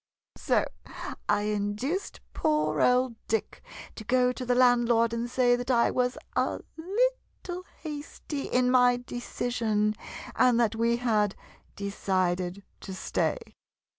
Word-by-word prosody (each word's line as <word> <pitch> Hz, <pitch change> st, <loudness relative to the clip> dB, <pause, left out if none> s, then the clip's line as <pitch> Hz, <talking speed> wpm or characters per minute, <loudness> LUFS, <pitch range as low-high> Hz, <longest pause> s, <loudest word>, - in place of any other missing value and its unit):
So -, -, +2 dB, 0.6 s
I 205 Hz, 0 st, +3 dB
induced 210 Hz, -, -2 dB
poor 305 Hz, -1 st, +1 dB
old 250 Hz, -1 st, +3 dB
Dick 225 Hz, -1 st, -2 dB, 0.3 s
to 220 Hz, -, -9 dB
go 250 Hz, +2 st, +3 dB
to 255 Hz, -, -6 dB
the 245 Hz, 0 st, +1 dB
landlord 240 Hz, -2 st, +4 dB
and 235 Hz, +1 st, -2 dB
say 245 Hz, -1 st, +3 dB
that 245 Hz, +1 st, -5 dB
I 235 Hz, -2 st, +4 dB
was 250 Hz, +2 st, 0 dB, 0.2 s
a -, -, +1 dB, 0.2 s
little 380 Hz, -1 st, -2 dB, 0.2 s
hasty 295 Hz, -2 st, -5 dB
in 250 Hz, 0 st, +2 dB
my 250 Hz, -1 st, +5 dB
decision, 235 Hz, -3 st, -1 dB, 0.4 s
and 250 Hz, -2 st, +4 dB
that 230 Hz, -2 st, +3 dB
we 230 Hz, +1 st, +2 dB
had 215 Hz, -5 st, +1 dB, 0.4 s
decided 185 Hz, -2 st, -1 dB, 0.2 s
to 190 Hz, -, -7 dB
stay. 190 Hz, -, 0 dB
245 Hz, 125 wpm, -28 LUFS, 215-255 Hz, 0.6 s, my